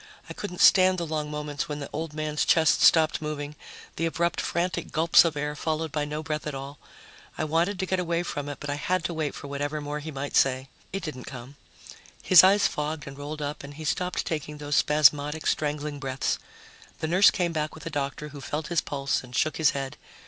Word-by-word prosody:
I - - -7
couldn't 180 -4 -5
stand 185 -1 +6
the 170 - -2
long 155 -1 -3
moments 150 +1 -4
when 150 - -3
the 140 - -6
old 160 -1 -4
man's 155 -1 -1
chest 160 -3 +4
stopped 160 -2 +5
moving, 150 -1 -4 0.4
the 165 - +1
abrupt 170 +1 0
frantic 175 +1 -2
gulps 165 +1 +6
of 165 -3 -1
air 150 +1 -2
followed 160 0 -2
by 150 0 -1
no 150 +1 -4
breath 155 -1 -3
at 150 - -4
all. 140 +1 -7 0.6
I - - -1
wanted 165 +6 +1
to 190 - -1
get 185 0 0
away 170 -1 0
from 145 -4 -4
it, 145 - -5
but 145 - -4
I 145 - -2
had 185 +4 0
to 170 - -2
wait 155 -3 -2
for - - -9
whatever 145 +2 -3
more 145 0 -4
he 155 +2 -7
might 140 -1 -5
say. 130 0 +2 0.2
It 195 -1 -4
didn't 150 -6 -6
come. 130 +1 -9 0.7
His 185 -2 +8
eyes 200 +2 +5
fogged 150 0 -4
and 140 - -8
rolled 145 +2 -6
up 145 0 -5
and 140 0 -9
he 155 +1 -8
stopped 180 +4 -1
taking 150 -2 -4
those 145 0 -2
spasmodic 150 +1 +3
strangling 150 -1 -1
breaths. 135 -1 -2 0.6
The 160 - -3
nurse 185 +5 +6
came 175 -3 -1
back 155 -1 -2
with 155 - -11
the 165 - -5
doctor, 145 +1 -3
who 145 -1 -10
felt 150 +3 -4
his 170 -3 +2
pulse 140 -2 -2
and 125 0 -10
shook 155 - +1
his 160 -2 +4
head. 135 -1 -4
150 Hz, 220 wpm, -26 LUFS, 145-165 Hz, 0.7 s, His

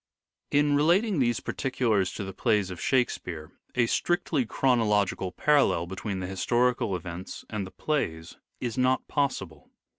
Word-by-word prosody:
In 145 0 +3
relating 175 +6 +3
these 120 -3 +1
particulars 115 -8 0
to - - -4
the 95 0 -6
plays 105 -5 +1
of 90 - -7
Shake 130 -2 +2
speare 80 -3 -7 0.2
a 120 -1 +4
strictly 150 -1 0
chronological 105 -7 +1
parallel 140 - +3
between 95 +1 -4
the - - -3
historical 120 +2 +1
events 85 +1 -7
and 105 -3 -3
the - - -9
plays 85 - -3 0.2
is 120 -1 -3
not 130 +1 +2
possible. 115 - -2
115 Hz, 145 wpm, -27 LUFS, 95-135 Hz, 0.2 s, a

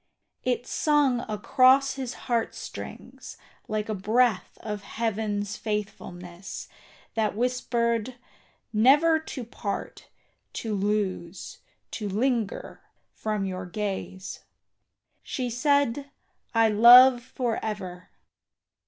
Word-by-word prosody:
It 245 -1 0
sung 290 -5 +2
across 255 +5 +4
his 260 -2 -5
heart 235 -3 0
strings - - -9 0.3
like 215 0 -2
a 220 - -2
breath 215 +2 +1
Of 210 -2 -4
Heaven's 210 -1 -2
faithfulness, 190 -4 -5 0.5
that 215 -2 0
whispered 235 -1 0 0.6
"Never 290 +9 +5
To 290 -5 -7
part, 215 -3 -6 0.4
to 220 -2 -3
lose, 195 -3 -2 0.3
to 210 -2 -4
linger 225 +1 -1 0.3
from 215 -2 -2
your 185 -1 -4
gaze." 190 -1 -5 0.8
She 250 -2 -3
said, 280 +1 +1 0.5
"I 225 0 +5
love 240 +4 +8
for 240 -1 -3
ever." 185 -4 -5
220 Hz, 95 wpm, -26 LUFS, 205-250 Hz, 0.8 s, love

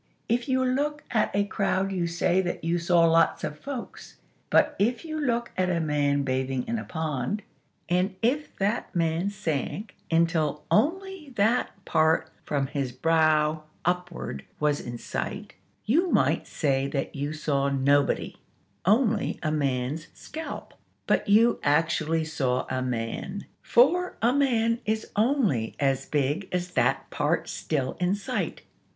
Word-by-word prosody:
If 240 +3 0
you 260 0 +2
look 290 +3 0
at 220 - +2
a 200 - +3
crowd 195 -2 0
you 180 -3 0
say 175 +2 +2
that 175 -3 -4
you 170 +1 +1
saw 170 0 +3
lots 165 0 +3
of 150 - -4
folks: 275 -4 -7 0.3
but - - +4
if 235 +9 +1
you 310 -1 -4
look 240 -4 0
at 185 0 +1
a 175 -2 +1
man 145 -2 +1
bathing 130 -1 -1
in 230 0 -1
a - - -5
pond; 160 - -3 0.4
and 180 +2 +1
if 285 +6 0
that 205 +2 -1
man 165 +2 +1
sank 195 - -3
until 165 -3 +1
only 340 - 0
that 220 +4 +2 0.2
part 160 0 +2
from 140 -2 0
his 135 -2 -3
brow 155 +2 +2 0.2
upward 175 - -2 0.2
was 150 -1 +2
in 120 0 -6
sight, - - -5 0.3
you 330 - +3
might - - +2
say 135 -3 0
that 140 -1 -3
you 145 +1 -2
saw 140 -3 0
nobody; 140 +1 +1 0.5
only 220 0 +2
a 155 - +1
man's 140 +1 -1
scalp. 320 +1 -7 0.3
But - - +1
you 230 +3 +5
actually 160 +1 +1
saw 130 -5 -1
a 130 0 0
man, 125 - -3 0.2
for 350 +9 +3
a 235 +2 +3
man 235 -5 +2
is 220 0 -2
only 210 - +1
as 135 -2 +1
big 145 +6 0
as 180 0 -2
that - - +1
part - - 0
still 135 -4 -2
in 180 +2 +2
sight. 200 - -3
170 Hz, 145 wpm, -27 LUFS, 145-225 Hz, 0.5 s, you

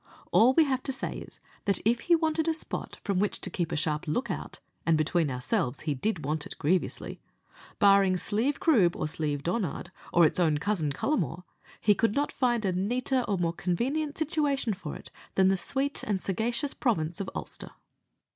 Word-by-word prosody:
All 245 +4 +6
we 325 - +7
have 265 -3 0
to 270 - -3
say 265 - -3
is, - - -11 0.3
that 200 - +2
if 235 +2 +3
he 345 - +3
wanted 320 0 0
a 325 - +2
spot 315 - -6
from 200 -3 0
which 205 +1 0
to 190 - -2
keep 175 -2 -2
a - - -1
sharp 155 +1 -1
look 155 - -1
out - - -6 0.2
and, 165 -1 +3
between 155 0 +1
ourselves, 130 - -1
he 150 - -1
did 160 +2 -2
want 150 +1 -2
it - - -9
grievously 180 +5 -1 0.6
barring 195 -2 +5
Slieve 225 +10 0
Croob, 205 - +4
or - - -2
Slieve 150 -2 -2
Donard, 180 -1 -2 0.2
or 170 -1 +6
its 155 - +1
own 160 -4 +3
cousin, 165 -3 -1
Cullamore, 175 - -1 0.4
he 210 - +4
could 225 +1 +1
not 290 +1 +1
find 240 -4 +1
a 190 - +2
neater 245 +7 0
or 200 - 0
more 170 -1 0
convenient 270 - -1
situation 285 -6 0
for 180 -6 -7
it - - -11 0.3
in 190 0 +5
the 195 - +3
sweet 275 +8 -1
and 205 -2 -1
sagacious 235 - -1
province 170 - -1
of 190 - -4
Ulster. - - -6
200 Hz, 195 wpm, -28 LUFS, 165-255 Hz, 0.6 s, we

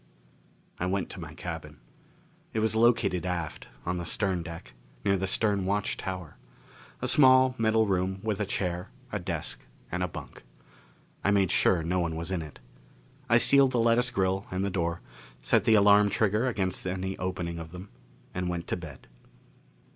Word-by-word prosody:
I 90 - -1
went 95 0 -1
to - - -7
my - - -8
cabin. - - -7 0.8
It 110 - 0
was 110 0 +1
located 110 -6 +3
aft, 90 -4 -4 0.2
on 90 +1 -1
the - - -4
stern 95 0 0
deck, 85 +1 -9 0.3
near 100 -1 +3
the 95 0 -1
stern 100 0 +1
watch 100 +2 0
tower. 90 -5 -6 0.7
A - - +1
small 130 -2 +6
metal 110 0 +3
room 95 -1 0
with 110 -2 -1
a 105 - 0
chair, 90 -2 -2 0.2
a 105 - -2
desk 85 -3 -4 0.3
and 90 - -2
a 90 - +1
bunk. - - -9 0.8
I - - +2
made 100 -3 +3
sure 85 -3 +3
no 90 +3 0
one 85 -2 -1
was 85 +3 -5
in 90 -3 -1
it. 75 -2 -10 0.7
I - - +6
sealed 140 -2 +5
the 120 - +2
lattice 115 +2 +3
grill 95 -2 0
and 95 +1 -1
the 100 - -2
door, 85 -2 -1 0.4
set - - +2
the 110 -2 +5
alarm 105 0 +6
trigger 105 +4 +1
against 95 -6 -2
any 95 +1 -3
opening 90 -2 -3
of 80 -1 -7
them, 90 +3 -10 0.4
and 90 0 -2
went 85 -1 -3
to - - -1
bed. 85 -4 -10
95 Hz, 175 wpm, -28 LUFS, 90-105 Hz, 0.8 s, small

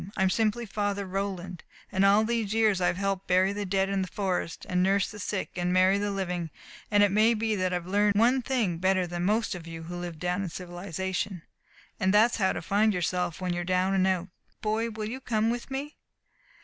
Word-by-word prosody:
I'm 190 -2 +3
simply 225 +2 0
Father 205 -1 -2
Roland, 185 -2 -4 0.3
and 190 -1 +2
all 200 +2 +5
these 225 -2 -1
years 215 -4 +3
I've 180 0 +1
helped 195 -1 -1
to - - +1
bury 190 +2 +4
the 205 -1 -4
dead 195 +1 +1
in 195 0 0
the 185 - -2
forest, 185 -4 -3
an' 180 0 +1
nurse 195 +1 +2
the 210 - -9
sick, 200 0 -3
an' 175 0 0
marry 185 +2 +4
the 205 0 -1
living, 180 -4 -2 0.4
an' 205 -1 +4
it 205 - +3
may 220 +3 +4
be 220 0 0
that 185 -1 0
I've 175 -1 -2
learned 205 +2 +2
one 245 +5 +4
thing 230 -10 -1
better 185 0 +2
than 175 0 -3
most 220 +3 +1
of 175 -2 -8
you 165 -1 -7
who 175 +2 -7
live 175 -2 -5
down 180 +4 -1
in 190 - -3
civilization. 180 +1 -4 0.6
And 190 -2 +2
that's 220 +4 +4
how 190 -4 +2
to - - -5
find 210 +1 +2
yourself 180 -1 -1
when 180 -1 -1
you're 175 0 -2
down 185 +1 +1
an' 190 -1 +3
out. 185 0 0 0.3
Boy, 220 +2 0
will 215 -1 -5
you 250 +4 -5
come 225 -2 +1
with 240 +2 -5
me?" 275 +3 -5
195 Hz, 220 wpm, -28 LUFS, 180-210 Hz, 0.6 s, all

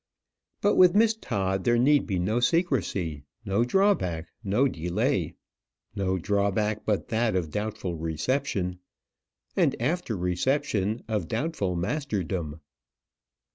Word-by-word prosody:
But 205 - +3
with 180 0 +7
Miss 225 +1 +5
Todd 95 - -2
there 120 0 +3
need 140 +4 +4
be 95 - -1
no 105 +7 +1
secrecy, 115 - 0 0.2
no 100 +3 +2
drawback, 120 - +1
no 105 +7 +2
delay 90 - -1 0.6
no 95 -2 0
drawback 100 +3 0
but 105 -2 0
that 115 -2 +1
of 85 -5 -1
doubtful 105 -3 -3
reception; 90 - -2 0.8
and - - +2
after 170 - -1
reception, 105 +3 0
of 105 -7 -1
doubtful 110 - -1
masterdom. 90 - -2
105 Hz, 115 wpm, -27 LUFS, 90-135 Hz, 0.8 s, with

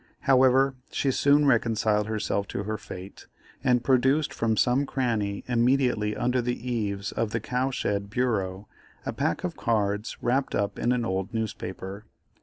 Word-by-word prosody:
However, 135 -1 +4 0.2
she 135 - 0
soon 145 +2 +4
reconciled 110 -4 +2
herself 105 -2 -1
to 100 - -4
her 110 0 -3
fate, 95 0 -10 0.4
and 125 -2 +3
produced 135 +4 +2
from 110 -1 0
some 130 +5 +2
cranny 110 -7 -1
immediately 120 -3 +2
under 125 +2 +1
the 120 +1 -2
eaves 105 -4 -2
of 115 - -1
the 115 - -1
cow 125 +2 -1
shed 100 -6 -2
bureau, 100 -5 -1 0.4
a - - -2
pack - - -1
of - - -3
cards 105 -2 -1
wrapped 130 +3 0
up 100 0 -1
in 120 - +1
an 125 -2 +1
old 95 +2 -2
newspaper. 100 -2 -5
115 Hz, 155 wpm, -26 LUFS, 105-125 Hz, 0.4 s, However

